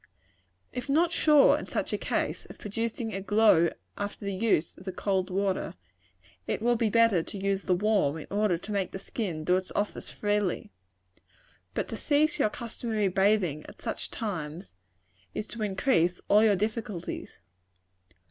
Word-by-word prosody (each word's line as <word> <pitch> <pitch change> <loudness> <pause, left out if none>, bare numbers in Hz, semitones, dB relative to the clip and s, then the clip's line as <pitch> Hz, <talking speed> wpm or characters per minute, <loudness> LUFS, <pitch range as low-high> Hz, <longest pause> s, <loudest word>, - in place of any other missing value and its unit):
If 250 +3 -5
not 330 +4 +3
sure, 300 -4 +5
in - - -7
such - - -2
a - - +1
case, - - -1
of - - -12
producing 225 +2 -3
a 195 - -3
glow 205 -5 +5 0.3
after 205 0 -4
the 200 - -1
use 190 -5 +1
of 185 - -14
the 190 - -3
cold 190 0 -1
water, 195 0 -1 0.7
it - - -1
will 240 +2 +2
be 225 -1 +1
better 230 -5 +4
to 200 - -7
use 195 0 0
the 180 - +3
warm, 195 -7 +2
in 155 - -7
order 205 -3 +2
to 205 - -8
make 195 -3 -1
the - - -3
skin 190 -5 -4
do 180 +3 +3
its 185 0 -5
office 205 0 -2
freely. 205 -3 -1 1.0
But - - -1
to 225 - -4
cease 300 +4 +2
your - - +3
customary 225 -3 -2
bathing 190 -5 +2
at - - -12
such - - -3
times, 175 -5 -5 0.6
is 215 - -2
to 230 +1 -8
increase 190 -4 +2
all 210 +2 +6
your 210 -2 +5
difficulties. 210 -2 -4
205 Hz, 165 wpm, -28 LUFS, 185-225 Hz, 1.0 s, all